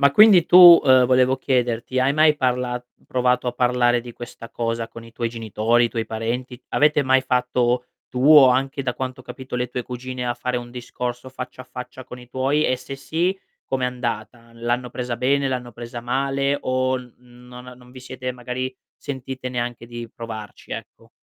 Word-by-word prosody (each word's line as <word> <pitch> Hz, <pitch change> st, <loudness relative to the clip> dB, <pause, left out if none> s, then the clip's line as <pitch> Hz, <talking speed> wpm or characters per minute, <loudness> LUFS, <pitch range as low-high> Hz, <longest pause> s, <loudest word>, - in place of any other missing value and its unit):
Ma 140 Hz, -1 st, +5 dB
quindi 190 Hz, +1 st, +7 dB
tu, 175 Hz, -2 st, +10 dB
ehm, 130 Hz, -1 st, +6 dB
volevo 130 Hz, +1 st, +3 dB
chiederti, 125 Hz, -2 st, -1 dB
hai 130 Hz, +2 st, +3 dB
mai 155 Hz, 0 st, +5 dB
parla 125 Hz, -2 st, -1 dB, 0.2 s
provato 125 Hz, 0 st, +1 dB
a 125 Hz, -, 0 dB
parlare 120 Hz, 0 st, +2 dB
di 120 Hz, 0 st, -10 dB
questa 120 Hz, -1 st, -10 dB
cosa 115 Hz, -1 st, -3 dB
con 115 Hz, 0 st, -11 dB
i 115 Hz, -, -15 dB
tuoi 115 Hz, 0 st, -2 dB
genitori, 115 Hz, +1 st, +1 dB
i -, -, +1 dB
tuoi 115 Hz, -1 st, -3 dB
parenti? 120 Hz, +3 st, -4 dB
Avete 150 Hz, 0 st, +3 dB
mai 130 Hz, 0 st, +3 dB
fatto 125 Hz, -1 st, 0 dB, 0.2 s
tu 125 Hz, +2 st, -1 dB
o 140 Hz, -3 st, +9 dB
anche 135 Hz, +2 st, 0 dB
da 125 Hz, -2 st, -2 dB
quanto 130 Hz, 0 st, -5 dB
ho -, -, -13 dB
capito 130 Hz, 0 st, -9 dB
le 125 Hz, 0 st, -1 dB
tue 125 Hz, +1 st, -4 dB
cugine, 125 Hz, +1 st, -6 dB
a 120 Hz, -, 0 dB
fare 125 Hz, 0 st, -3 dB
un 120 Hz, 0 st, -6 dB
discorso 125 Hz, 0 st, -5 dB
faccia 130 Hz, 0 st, -8 dB
a -, -, -18 dB
faccia 125 Hz, 0 st, -9 dB
con 125 Hz, 0 st, -10 dB
i 125 Hz, -1 st, -14 dB
tuoi, 135 Hz, +4 st, 0 dB
e 130 Hz, -, +1 dB
se 130 Hz, +2 st, -8 dB
sì 170 Hz, +7 st, -1 dB, 0.3 s
com'è 130 Hz, -1 st, -1 dB
andata? 120 Hz, -1 st, -4 dB
L'hanno 120 Hz, +2 st, -2 dB
presa 125 Hz, -1 st, -4 dB
bene, 135 Hz, +2 st, +2 dB
l'hanno 125 Hz, -2 st, -4 dB
presa 120 Hz, 0 st, -8 dB
male 135 Hz, +3 st, 0 dB
o 130 Hz, -1 st, 0 dB, 0.2 s
non 125 Hz, 0 st, -14 dB
a 125 Hz, -, -10 dB
non 125 Hz, 0 st, -18 dB
vi 130 Hz, 0 st, -12 dB
siete 130 Hz, 0 st, -6 dB
magari 125 Hz, +1 st, -5 dB, 0.2 s
sentite 130 Hz, -1 st, -6 dB
neanche 120 Hz, -1 st, -4 dB
di 120 Hz, 0 st, -8 dB
provarci, 110 Hz, -2 st, -9 dB
ecco? 115 Hz, +1 st, -9 dB
125 Hz, 190 wpm, -22 LUFS, 120-130 Hz, 0.3 s, tu